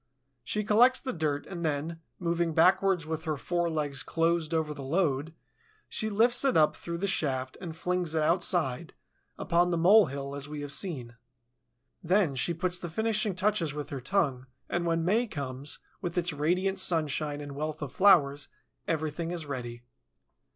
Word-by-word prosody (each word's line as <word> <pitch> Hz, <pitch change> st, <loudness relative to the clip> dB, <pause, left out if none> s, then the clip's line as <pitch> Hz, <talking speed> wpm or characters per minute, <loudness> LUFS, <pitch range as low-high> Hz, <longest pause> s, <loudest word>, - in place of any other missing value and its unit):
She 210 Hz, -, -1 dB
collects 240 Hz, +5 st, +5 dB
the 260 Hz, -, -4 dB
dirt 150 Hz, -3 st, -1 dB
and 175 Hz, -3 st, -6 dB
then, 160 Hz, +2 st, -2 dB, 0.2 s
moving 170 Hz, -2 st, -1 dB
backwards 180 Hz, +1 st, +4 dB
with 160 Hz, 0 st, -4 dB
her 155 Hz, -2 st, -1 dB
fore 175 Hz, +4 st, -1 dB
legs 145 Hz, -4 st, -1 dB
closed 165 Hz, -1 st, 0 dB
over 160 Hz, -2 st, 0 dB
the 145 Hz, -, -9 dB
load, 150 Hz, 0 st, 0 dB, 0.5 s
she 220 Hz, -, -1 dB
lifts 235 Hz, +5 st, +3 dB
it 270 Hz, -2 st, +3 dB
up 155 Hz, -1 st, +4 dB
through 170 Hz, 0 st, -5 dB
the 190 Hz, -, -2 dB
shaft 130 Hz, -8 st, -1 dB
and 165 Hz, -4 st, -6 dB
flings 180 Hz, -1 st, -1 dB
it 155 Hz, -, +2 dB
outside, 170 Hz, -4 st, 0 dB, 0.4 s
upon 175 Hz, 0 st, +2 dB
the 170 Hz, -, 0 dB
mole 195 Hz, +4 st, +6 dB
hill, 140 Hz, +1 st, -5 dB
as 140 Hz, 0 st, -5 dB
we 150 Hz, -1 st, -5 dB
have 145 Hz, -1 st, -5 dB
seen. 130 Hz, -8 st, -3 dB, 0.9 s
Then 180 Hz, -3 st, +2 dB
she 135 Hz, +6 st, 0 dB
puts 180 Hz, +2 st, -2 dB
the 175 Hz, -, -5 dB
finishing 215 Hz, +1 st, 0 dB
touches 185 Hz, -6 st, +1 dB
with 145 Hz, -1 st, -5 dB
her 135 Hz, -2 st, -4 dB
tongue, 135 Hz, -5 st, 0 dB, 0.2 s
and 175 Hz, 0 st, -1 dB
when 165 Hz, 0 st, +1 dB
May 225 Hz, +7 st, +2 dB
comes, 140 Hz, -, -6 dB, 0.2 s
with 175 Hz, -1 st, -4 dB
its 175 Hz, -1 st, 0 dB
radiant 180 Hz, +6 st, 0 dB
sunshine 155 Hz, -4 st, 0 dB
and 145 Hz, -1 st, -7 dB
wealth 150 Hz, +2 st, -4 dB
of 140 Hz, -, -5 dB
flowers, 150 Hz, -8 st, +4 dB, 0.4 s
everything 160 Hz, +1 st, -2 dB
is 170 Hz, -3 st, -4 dB
ready. 120 Hz, -4 st, -6 dB
165 Hz, 170 wpm, -29 LUFS, 145-180 Hz, 0.9 s, mole